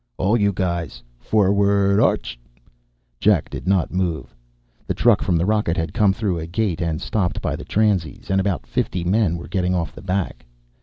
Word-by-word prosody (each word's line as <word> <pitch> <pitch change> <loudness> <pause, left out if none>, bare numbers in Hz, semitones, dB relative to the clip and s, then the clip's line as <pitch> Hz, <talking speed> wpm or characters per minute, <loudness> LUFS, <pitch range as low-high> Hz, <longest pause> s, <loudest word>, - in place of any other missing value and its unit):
"All 100 +5 +2
you 100 -3 +2
guys, 85 -9 -3 0.2
for'ard 100 - +2
'arch!" - - +1 0.8
Jack 100 -7 +2
did - - -7
not 95 -3 +1
move. 85 -8 -2 0.5
The - - -1
truck 115 -4 +4
from 90 -3 +1
the 85 - +1
rocket 105 -4 +1
had 80 -3 -2
come 105 -4 +3
through 95 -3 -2
a 80 - -5
gate 90 -1 -1
and 80 -3 -1
stopped 95 -5 -1
by - - -2
the - - -8
transies, 100 -8 0
and 95 0 +3
about 95 -2 -2
fifty 90 - -2
men 90 -1 +1
were 85 - -9
getting 90 -1 0
off 85 -2 -2
the - - -11
back. 95 -1 -3
95 Hz, 185 wpm, -21 LUFS, 85-100 Hz, 0.8 s, truck